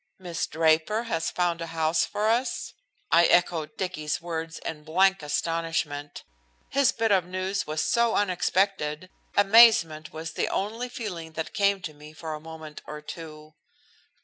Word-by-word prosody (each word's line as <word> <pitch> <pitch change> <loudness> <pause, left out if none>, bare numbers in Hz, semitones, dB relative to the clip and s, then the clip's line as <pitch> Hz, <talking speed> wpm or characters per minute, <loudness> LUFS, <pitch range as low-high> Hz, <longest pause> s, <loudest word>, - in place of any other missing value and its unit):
"Miss 175 -3 -3
Draper 160 +7 +2
has 165 -9 -1
found 175 -2 -1
a 165 - -4
house 160 0 +1
for 210 +1 -2
us!" 235 +4 0 0.4
I 170 +1 +6
echoed 170 -3 +2
Dicky's 155 -5 -2
words 165 -1 -5
in 150 -2 -6
blank 190 +4 +3
astonishment. 150 -1 -2 0.5
His 275 -3 +3
bit 225 -1 0
of 190 -3 +4
news 185 +2 -2
was 155 0 -1
so 235 -1 +2
unexpected, 185 -3 0 0.3
amazement 200 -7 +6
was 160 +1 -6
the - - -1
only 225 +5 -2
feeling 175 -10 -6
that 160 0 -5
came 200 -2 +2
to 155 - -5
me 150 +1 -13
for 160 0 -6
a 155 - -5
moment 160 -1 -9
or 150 - -6
two. 155 -1 -9
165 Hz, 150 wpm, -26 LUFS, 155-195 Hz, 0.5 s, I